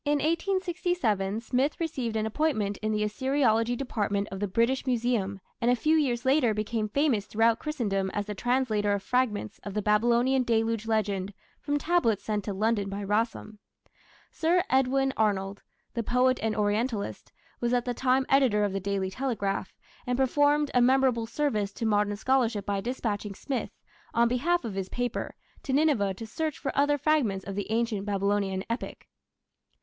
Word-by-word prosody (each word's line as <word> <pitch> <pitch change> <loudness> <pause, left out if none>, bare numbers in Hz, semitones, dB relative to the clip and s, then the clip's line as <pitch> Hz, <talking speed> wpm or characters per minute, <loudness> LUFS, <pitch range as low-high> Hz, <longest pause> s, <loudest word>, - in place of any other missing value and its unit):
In 290 - +1
1867 335 - 0
Smith 260 +5 0
received 265 -9 -2
an 215 0 0
appointment 220 -5 0
in 215 0 -2
the 210 0 0
Assyriology 240 0 +1
Department 205 -6 -1
of 195 - -5
the 205 - -1
British 235 +7 +1
Museum, 230 -6 0 0.2
and 235 - +2
a 245 - +5
few 310 +7 +2
years 255 -6 +1
later 260 -5 +3
became 215 0 -2
famous 245 -5 +1
throughout 225 +1 +2
Christendom 205 -11 -1
as 205 +1 -3
the 210 - -4
translator 220 -3 +1
of 200 -1 -2
fragments 220 -3 -1
of 200 -1 -7
the 210 - +1
Babylonian 235 +5 +3
Deluge 225 -2 0
Legend 205 -3 -1 0.2
from 290 0 -1
tablets 290 - +1
sent 210 -2 -2
to 205 - -2
London 205 0 0
by 200 +1 -4
Rassam. 215 +1 -2 0.7
Sir 345 +2 +2
Edwin 270 +1 +2
Arnold, 200 -2 0 0.3
the 235 - -1
poet 250 +3 +2
and 220 -1 0
Orientalist, 210 +1 -1 0.3
was 240 0 0
at 245 -1 +1
the 245 - -1
time 260 +2 +2
editor 255 -7 +3
of 200 -2 0
the 195 - -1
Daily 195 -1 -2
Telegraph, 205 -6 -2 0.4
and 250 0 0
performed 290 +2 +2
a 250 - +4
memorable 255 -2 +3
service 225 -5 -1
to 230 - -4
modern 205 -1 +2
scholarship 235 -2 +1
by 200 -1 -1
dispatching 210 -4 -3
Smith, 265 +3 -3 0.5
on 235 0 +4
behalf 270 +6 +1
of 220 - -4
his 190 -1 -4
paper, 245 -1 -3 0.3
to 275 - -4
Nineveh 265 -10 +2
to 225 - -7
search 310 +7 -3
for 275 - -4
other 290 +1 +3
fragments 255 -11 +1
of 195 - -5
the 205 +1 -4
Ancient 220 -3 -1
Babylonian 200 -1 0
epic. 230 +2 -5
230 Hz, 170 wpm, -28 LUFS, 205-265 Hz, 0.7 s, a